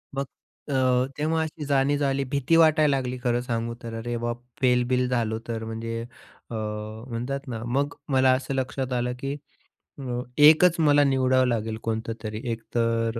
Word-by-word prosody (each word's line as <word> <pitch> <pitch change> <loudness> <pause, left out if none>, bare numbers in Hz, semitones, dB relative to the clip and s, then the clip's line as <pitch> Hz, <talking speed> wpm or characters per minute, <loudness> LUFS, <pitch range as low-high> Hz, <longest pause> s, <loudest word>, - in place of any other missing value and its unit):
मग 140 0 -1 0.4
अ, 130 -2 +2
तेव्हा 160 +2 0
अशी 160 -1 -6
जाणीव 140 0 +2
झाली. 140 -1 0
भीती 140 +4 +1
वाटायला 155 -3 +5
लागली 130 -1 -3
खरं 120 -1 +1
सांगू 115 -1 -2
तर 115 -1 -6
"अरे 120 +1 -3
बाप! 120 0 -3 0.2
फेलबिल 125 0 +2
झालो 115 -3 0
तर" 115 -1 -3
म्हणजे 115 +1 -4 0.5
अ, - - -8
म्हणतात 110 +5 -5
ना 115 -3 -5
मग 140 +4 0 0.2
मला 130 -1 +4
असं 130 +1 -5
लक्षात 130 0 -2
आलं 125 0 0
की 135 +2 -3 0.7
अ, 125 -2 -3 0.2
एकच 160 +3 +7
मला 145 -2 +5
निवडावं 130 -2 +3
लागेल 110 -2 -1
कोणतं 115 0 -2
तरी 110 0 -4
एक 115 0 -4
तर 115 0 +1
125 Hz, 165 wpm, -25 LUFS, 115-140 Hz, 0.7 s, एकच